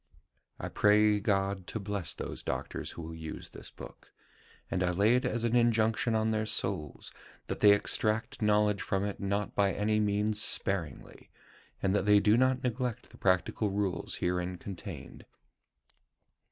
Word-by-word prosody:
"I - - -4
pray 105 0 +4
God 100 -2 0
to 110 - -4
bless 100 -3 -3
those - - -5
doctors - - -4
who 85 - -7
will 80 +1 -7
use 80 -1 -8
this - - -9
book; - - -13 0.6
and 95 - 0
I 90 - +2
lay 100 +6 +3
it 125 - +1
as 115 - -1
an 120 0 +1
injunction 115 -1 +2
on 110 0 +1
their 110 0 -1
souls, 95 -8 -1 0.3
that - - -4
they 105 - +7
extract 110 +3 0
knowledge 105 -1 +3
from 95 0 -1
it 100 -1 -3
not 100 +1 -2
by 100 -1 +2
any 105 +1 +1
means 105 +1 +1
sparingly, 85 -11 -3 0.5
and 95 +1 +2
that 100 0 0
they 105 0 +7
do 105 +1 +4
not 130 +1 +2
neglect 125 -2 -3
the - - -15
practical 95 +3 +1
rules 95 -3 -2
herein 90 0 -2
contained. 95 0 -8
105 Hz, 160 wpm, -30 LUFS, 95-110 Hz, 0.6 s, they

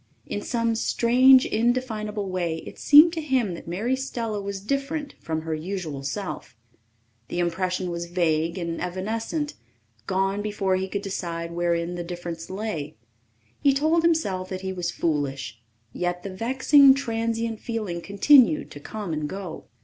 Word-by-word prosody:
In 205 - -4
some 230 0 0
strange, 255 +3 +5
indefinable 220 -3 -1
way 175 -3 -2
it - - -10
seemed 305 +3 +8
to 325 - -2
him 260 - 0
that 170 - -9
Mary 215 +10 0
Stella 230 -5 -3
was 200 0 -4
different 275 +7 -3
from 160 -1 -3
her 160 0 -3
usual 160 -3 -4
self. 145 - -5 0.7
The - - -5
impression 180 +1 -1
was 170 0 -4
vague 165 -1 0
and 170 -2 -3
evanescent 225 - -3 0.5
gone 195 +2 0
before 205 -2 0
he 190 +1 -1
could 200 +1 -4
decide 170 -4 -4
wherein 170 0 0
the 175 0 -4
difference 170 -1 -6
lay. 185 - -4 0.6
He 275 -1 +3
told 315 +4 +3
himself 205 - +1
that 185 -1 -5
he 190 0 -3
was 180 -2 -2
foolish, 135 -8 -2 0.3
yet 175 0 -2
the 195 - -6
vexing, 265 +6 +5
transient 230 -3 -2
feeling 210 -7 -4
continued 270 - +4
to 145 - -9
come 200 +3 -5
and 150 -1 -2
go. 190 -3 -7
195 Hz, 150 wpm, -25 LUFS, 170-235 Hz, 0.7 s, seemed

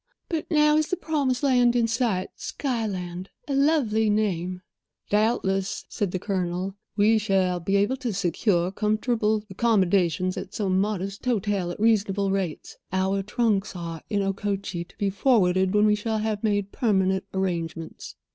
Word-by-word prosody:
But 325 -3 -3
now 300 -1 +4
is 310 0 +1
the 365 - -1
promised 285 -7 -1
land 245 -3 +4
in 235 -1 +3
sight. 225 -5 0
Skyland!—a 200 -3 -4
lovely 270 -7 +2
name." 185 -4 -1 0.5
"Doubtless," 205 -3 +1
said 205 - -2
the 185 - -2
Colonel, 185 -1 -2 0.2
"we 215 +2 +4
shall 190 -4 +1
be 195 +4 -1
able 205 +7 +2
to 250 -3 -3
secure 180 -1 +1
comfortable 215 +1 0
accommodations 185 -4 +1
at 190 - -6
some 190 -3 +1
modest 200 -1 -3
hotel 205 -6 0
at 175 - -6
reasonable 205 -3 +2
rates. 190 -5 -3
Our 190 +1 +1
trunks 210 -1 0
are 165 -2 -6
in 205 -2 0
Okochee, 195 -2 -2
to - - -22
be 200 -1 0
forwarded 190 -4 +2
when 210 0 +5
we 210 - +4
shall 220 +1 -1
have 215 -1 -2
made 205 -2 0
permanent 190 -5 +1
arrangements." 170 -4 -4
200 Hz, 145 wpm, -25 LUFS, 185-225 Hz, 0.5 s, when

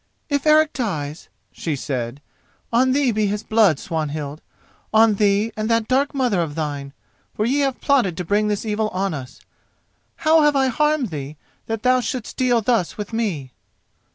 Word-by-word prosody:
"If 285 +1 0
Eric 310 0 +5
dies," 155 - -4 0.2
she 160 -3 -3
said, 130 -1 -4 0.5
"on 255 +2 +4
thee 270 -2 +2
be 215 -1 +1
his 210 +1 -2
blood, 215 -8 +3
Swanhild—on 155 +8 -1
thee 205 +2 +2
and 215 +1 -2
that 230 -1 +1
dark 275 +2 +1
mother 245 -9 +1
of 155 -3 -3
thine, 145 -3 -4 0.4
for 215 - 0
ye 270 +5 +1
have 270 -3 0
plotted 240 -12 +2
to 180 - -3
bring 205 +4 +1
this 210 +1 -2
evil 215 0 0
on 195 -2 -2
us. 130 -3 -8 0.7
How 320 0 +4
have 295 -1 +3
I 265 -1 +3
harmed 300 -2 +1
thee 145 0 -6 0.3
that 225 -1 -3
thou 255 0 +4
shouldst 250 -2 -4
deal 245 -2 +2
thus 220 -5 0
with 210 +1 -6
me?" 180 - -2
215 Hz, 170 wpm, -21 LUFS, 160-255 Hz, 0.7 s, Eric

